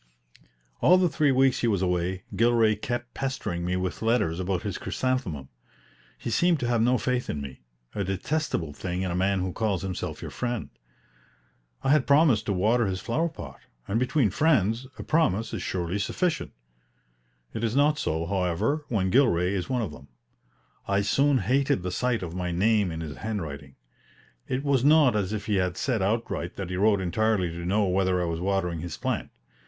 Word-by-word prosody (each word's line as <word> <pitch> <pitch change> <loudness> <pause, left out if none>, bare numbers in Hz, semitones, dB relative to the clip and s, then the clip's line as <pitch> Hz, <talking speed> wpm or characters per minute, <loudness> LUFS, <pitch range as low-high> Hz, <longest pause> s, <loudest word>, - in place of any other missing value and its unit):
All 180 +3 +6
the 185 -1 +3
three 150 -2 +2
weeks 130 0 +3
he 120 - +1
was 100 -4 +1
away, 90 +1 -1
Gilray 115 -2 +3
kept 120 +3 -4
pestering 110 -10 -3
me 90 +1 -1
with 90 0 -3
letters 110 -8 +1
about 95 0 -1
his - - -4
chrysanthemum. 110 - -2 0.7
He 115 - -5
seemed 170 +7 +3
to 120 - 0
have 120 -2 +2
no 125 +2 +3
faith 125 0 -1
in 75 - -2
me 70 -2 -8 0.3
a 100 - -2
detestable 95 - -2
thing 90 +4 -3
in 95 - -2
a - - -2
man 95 +1 +1
who 90 -1 -3
calls 105 -5 -1
himself 95 -2 -4
your - - -7
friend. 120 -3 -3 1.1
I 135 - +2
had 150 -3 +3
promised 140 -7 +4
to 100 - +1
water 110 +5 +2
his 95 -1 -2
flower 155 - -1
pot; 155 - -10 0.3
and 110 +4 0
between 125 - +2
friends 120 - +2
a - - -6
promise 115 - +1
is - - -3
surely 90 +2 -2
sufficient. 170 - -1 1.0
It 110 - -4
is 115 +1 0
not 150 +1 +3
so, 80 +1 -1
however, 95 - 0
when 95 -5 0
Gilray 90 -8 +3
is 90 -3 -3
one 125 -3 0
of 95 - -4
them. 70 -2 -13 0.8
I 100 0 +2
soon 135 +7 +3
hated 130 -7 +1
the 90 - -3
sight 120 +1 0
of 85 -2 -5
my 90 -1 -3
name 105 +2 +2
in 80 -1 -5
his 75 -3 -6
handwriting. 75 -11 -5 0.7
It 130 +2 -2
was 140 -4 +2
not 145 -5 +5
as 100 -2 0
if 105 -1 -3
he 105 -3 +1
said 120 -2 -1
outright 100 -4 -1
that 95 -2 -5
he - - -2
wrote 100 +1 +3
entirely 95 0 +1
to 85 +1 -6
know 105 +4 +2
whether 95 -1 +1
I 90 - 0
was 85 -1 -2
watering 90 -2 -1
his 85 -1 -6
plant. - - -2
105 Hz, 190 wpm, -26 LUFS, 90-125 Hz, 1.1 s, All